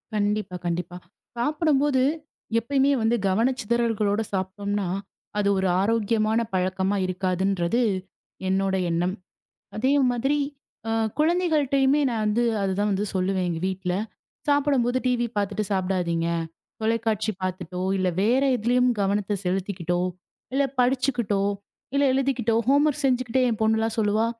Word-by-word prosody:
கண்டிப்பா, 210 -2 -1
கண்டிப்பா. 175 +1 -3 0.4
சாப்புடும்போது 290 0 +2 0.6
எப்பயுமே 270 +4 +2
வந்து 225 +2 +2
கவனச்சிதறல்களோட 225 -1 +1
சாப்ட்டோம்னா, 200 +1 -2 0.5
அது 205 - +1
ஒரு 190 0 +1
ஆரோக்கியமான 220 +1 +1
பழக்கமா 190 +1 0
இருக்காதுன்றது 185 +3 0 0.7
என்னோட 190 0 +1 0.2
எண்ணம். 175 +3 0 0.6
அதே 260 +6 +2 0.2
மாதிரி 270 +5 0 0.5
அ - - 0 0.3
குழந்தைகள்ட்டயுமே 300 -4 +2
நான் 230 -2 -1
வந்து 215 +3 +2 0.2
அது 195 -1 0
தான் 205 +1 +1
வந்து 200 +1 0
சொல்லுவேன் 185 0 0
எங்க 165 -1 -2
வீட்ல. 190 -1 -2 0.5
சாப்பிடும்போது 275 -4 +2
டிவி 245 -1 +2
பாத்துட்டு 205 +1 0
சாப்டாதீங்க. 180 -3 0 0.5
தொலைக்காட்சி 220 -1 0
பாத்துட்டோ, 180 -1 -4 0.2
இல்ல, 185 -1 +1
வேற 240 +6 +3
எதுலயும் 245 +2 +2
கவனத்தை 205 +1 0
செலுத்திக்கிட்டோ, 180 -1 -1 0.6
இல்ல 280 +1 +3 0.2
படிச்சுக்கிட்டோ, 245 -5 +1 0.5
இல்ல 280 - +3
எழுதிக்கிட்டோ 260 -4 +1
ஹோம்வொர்க் 290 +2 +3
செஞ்சுகிட்டே 255 -1 +1
என் 225 - -2
பொண்ணு 220 0 +3
எல்லாம் 225 0 -1
சொல்லுவா. 215 +1 +2
215 Hz, 115 wpm, -25 LUFS, 190-250 Hz, 0.7 s, வேற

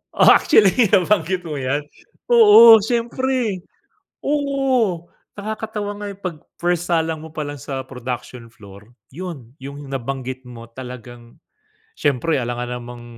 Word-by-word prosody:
Oh, - - +6
actually 215 +2 +4
nabanggit 185 -2 +2
mo 150 -4 -5
yan. 135 +3 -1 0.5
Oo, 415 - +9
siyempre. 235 -1 -1 0.6
Oo, 270 - 0 0.3
nakakatawa 210 0 -5
nga 205 0 -7
yung 195 - -13
'pag 175 -5 -4 0.2
first 175 0 -1
salang 160 -1 0
mo 160 - -10
palang 150 -2 -5
sa 135 0 -5
production 125 -2 -7
floor. 100 +1 -15 0.2
Yun, 145 -8 -8
yung 140 +1 -9
nabanggit 130 0 -5
mo 115 -2 -11
talagang 120 -1 -11 0.6
siyempre 145 +1 0
alangan 120 0 -4
namang 120 0 -10
160 Hz, 125 wpm, -20 LUFS, 125-205 Hz, 0.6 s, Oo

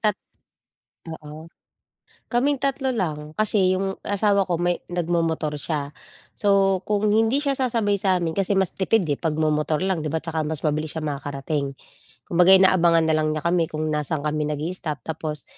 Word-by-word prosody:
tat 210 -2 +1 0.9
oo. 155 +1 -9 0.8
Kaming 275 +4 +2
3 270 0 -1
lang, 155 -5 -3
kasi 195 -3 +2
yung 195 0 -3
asawa 200 -1 +1
ko 175 - +1
may 175 +1 0
nagmomotor 165 -3 -1
siya. 145 -2 -3 0.4
So, 195 -2 +2
kung 210 0 +1
hindi 225 +7 +2
siya 280 - +2
sasabay 230 -6 0
sa'min 180 -4 +1
kasi 195 +1 0
mas 190 -2 +1
tipid, 195 +1 +1
eh, 145 -3 -2
'pag 155 -2 -1
momotor 155 +1 0
lang 190 -3 0
'di 155 - -3
ba. 160 - -2
Tsaka 160 0 -3
mas 155 -1 -4
mabilis 155 +1 -1
siyang 155 -2 -2
makakarating, 140 0 -4 0.5
kumbaga 180 +2 +6
inaabangan 170 -3 +4
nalang 155 -1 +1
niya 155 - -5
kami 170 -1 +2
kung 155 0 -4
nasa'n 150 0 -2
kami 150 0 -1
nag-i-stop. 150 -2 -4
Tapos 155 -3 -4
165 Hz, 160 wpm, -23 LUFS, 155-195 Hz, 0.9 s, kumbaga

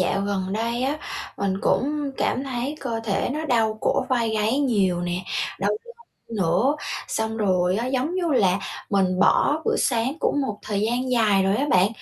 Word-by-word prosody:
dạo 185 +2 +1
gần 195 -2 -2
đây 230 +3 -1
á 280 +3 0 0.4
mình 195 -1 -1
cũng 285 +3 0
cảm 265 - 0
thấy 265 +2 -3
cơ 230 -4 -3
thể 200 -3 0
nó 310 +2 -3
đau 225 -6 +1
cổ - - +1
vai 235 -3 +1
gáy 220 +4 +1
nhiều 200 -10 +2
nè, 175 0 -2 0.4
đau 200 +1 +1
lưng 470 - -6 0.5
nữa, 220 - +2 0.3
xong 220 0 -2
rồi 185 -3 +2
á, 235 +3 -1
giống 265 +6 -1
như 350 -4 0
là 190 -7 +3 0.3
mình 185 -2 +2
bỏ 295 +8 +4
bữa - - +1
sáng 240 0 +1
cũng 290 - +1
một 215 -7 -3
thời 205 -2 -2
gian 245 +4 0
dài 215 -5 +3
rồi 195 +2 +2
á 280 +5 0
bạn, 185 +1 +5
225 Hz, 190 wpm, -24 LUFS, 195-265 Hz, 0.5 s, bạn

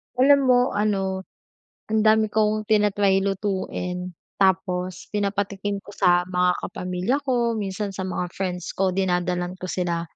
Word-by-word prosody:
Alam 280 +3 +6
mo 250 -1 +6
ano, 195 -2 -1 0.6
ang 220 0 +1
dami 220 0 +4
kong 215 0 0
tina-try 205 -2 +3
lutuin. 185 -2 -2 0.2
Tapos 185 -2 0
pinapatikim 200 0 -1
ko 200 +1 -13
sa 175 -1 +3
mga 180 0 +1
kapamilya 180 +7 -2
ko, 240 -4 +1
minsan 200 -1 -3
sa 190 - -4
mga 185 -1 -2
friends 180 -2 -4
ko, 190 0 +1
dinadalhan 180 -1 -1
ko 185 0 -6
sila 170 -2 -1
195 Hz, 135 wpm, -24 LUFS, 180-210 Hz, 0.6 s, Alam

